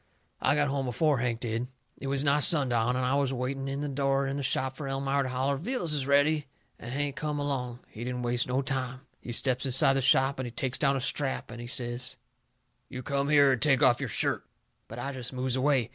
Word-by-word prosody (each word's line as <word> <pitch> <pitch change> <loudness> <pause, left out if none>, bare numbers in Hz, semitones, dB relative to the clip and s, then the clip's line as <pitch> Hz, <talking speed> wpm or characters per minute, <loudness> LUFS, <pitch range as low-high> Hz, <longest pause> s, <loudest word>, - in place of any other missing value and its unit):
I - - +3
got 145 -1 +2
home 135 -1 -1
before 145 +3 +1
Hank 120 -1 -1
did. 115 +1 -2 0.3
It 140 - -5
was 135 0 +1
nigh 145 0 +3
sundown, 125 -6 +4
and 130 0 0
I 130 - +1
was 140 -1 +1
waiting 135 +1 -3
in 140 +1 -3
the 145 - -2
door 135 0 0
of 135 0 -2
the 140 - -3
shop 130 0 -1
fur 140 0 -6
Elmira 135 +1 0
to 130 - -2
holler 135 +2 0
vittles 175 - -2
is 140 -3 -1
ready, 145 +1 +3 0.3
and 120 - -8
Hank 140 +1 -1
come 150 -1 -3
along. 130 -4 -3
He 110 - -9
didn't 125 0 -3
waste 120 0 0
no 130 +2 0
time. 130 -2 -3 0.2
He 120 - -7
steps 125 +1 +1
inside 135 0 +3
the 135 - +1
shop 135 +1 +3
and 130 - -2
he - - -7
takes 130 +2 -2
down 140 -2 +3
a - - -3
strap 140 -1 -2
and 120 0 -8
he 120 - -7
says: 125 0 -2 0.7
"You 130 0 -7
come 140 +1 -1
here 145 -2 +6
and 130 - 0
take 145 -1 +4
off 125 -2 +5
your - - -3
shirt." - - 0 0.4
But 115 - -9
I 135 +3 -3
jest 130 -2 -4
moves 130 0 -1
away. 130 -3 +2
135 Hz, 235 wpm, -28 LUFS, 125-140 Hz, 0.7 s, here